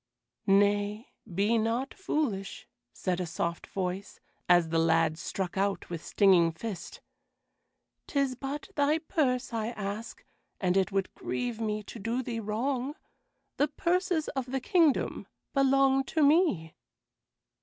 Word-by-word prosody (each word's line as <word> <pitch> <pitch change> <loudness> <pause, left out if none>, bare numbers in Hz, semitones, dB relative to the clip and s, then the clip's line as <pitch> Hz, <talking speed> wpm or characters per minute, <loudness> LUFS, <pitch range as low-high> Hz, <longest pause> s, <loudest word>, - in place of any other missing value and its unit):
"Nay, 205 +2 +2 0.2
be 205 +6 +2
not 230 +5 -1
foolish," 260 - -2 0.2
said 180 -2 -2
a 180 - -2
soft 170 +1 -3
voice, 190 +1 -4 0.3
as 175 -2 +5
the 165 0 +2
lad 165 -1 +3
struck 190 +1 -3
out 195 -3 -1
with 170 -1 -5
stinging 180 -4 +4
fist; 200 +3 -7 1.1
"'tis 275 -2 +1
but 275 +6 -5
thy 290 0 +3
purse 275 -7 0
I 220 -1 -1
ask, 215 0 -5 0.3
and 180 -2 +1
it 195 +1 +2
would 195 -1 -1
grieve 240 -2 -3
me 215 -1 -1
to 225 - -9
do 230 +5 -1
thee 235 -2 -3
wrong. 250 +6 -2 0.6
The 290 - +3
purses 345 +1 0
of 265 -3 -3
the 265 +1 -1
kingdom 320 +1 +2 0.3
belong 270 0 +4
to 315 +2 +1
me." 285 - +3
225 Hz, 135 wpm, -29 LUFS, 195-275 Hz, 1.1 s, as